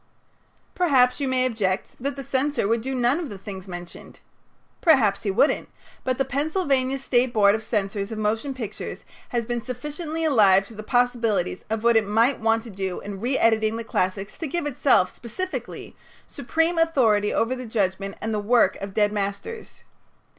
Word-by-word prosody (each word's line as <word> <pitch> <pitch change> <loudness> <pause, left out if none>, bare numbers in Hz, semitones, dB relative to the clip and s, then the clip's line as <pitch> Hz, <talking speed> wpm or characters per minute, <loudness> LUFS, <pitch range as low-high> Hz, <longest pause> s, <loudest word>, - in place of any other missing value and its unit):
Perhaps 270 -9 +3
you 280 - -1
may 255 -1 +1
object 205 -6 -1
that 280 +3 -3
the 275 - -6
censor 275 -2 0
would 230 +1 +1
do 265 +3 -3
none 250 +5 +2
of 330 -6 -4
the 200 - -7
things 190 -1 -8
mentioned. 175 -1 -10 0.6
Perhaps 230 - +4
he 205 - -2
wouldn't, 200 +9 +2 0.3
but 255 -1 -1
the 270 - +1
Pennsylvania 275 -1 0
State 255 -2 +1
Board 205 -3 +5
of 220 +1 -2
Censors 200 -1 -2
of 220 - -4
Motion 225 +6 -1
Pictures 230 -6 -6 0.2
has 235 -2 -1
been 240 0 -2
sufficiently 300 +6 -4
alive 200 -9 +5
to 225 - -13
the 215 - -7
possibilities 230 -6 0
of 220 0 -2
what 235 0 +4
it 220 -2 +3
might 230 +5 +2
want 225 0 +1
to 235 - -10
do 190 -2 -4
in 200 -1 -7
reëditing 225 -3 +2
the 230 - -4
classics 195 -1 -2
to 325 - -3
give 340 +3 -2
itself, 260 -9 +3
specifically, 370 - -6 0.3
supreme 325 +5 0
authority 230 -11 +3
over 235 +3 0
the 255 -1 -7
judgment 195 -2 -1
and 220 +1 -2
the 210 - 0
work 210 -1 +3
of 195 -1 -7
dead 210 -1 +3
masters. 200 - -5
230 Hz, 175 wpm, -24 LUFS, 205-270 Hz, 0.6 s, Board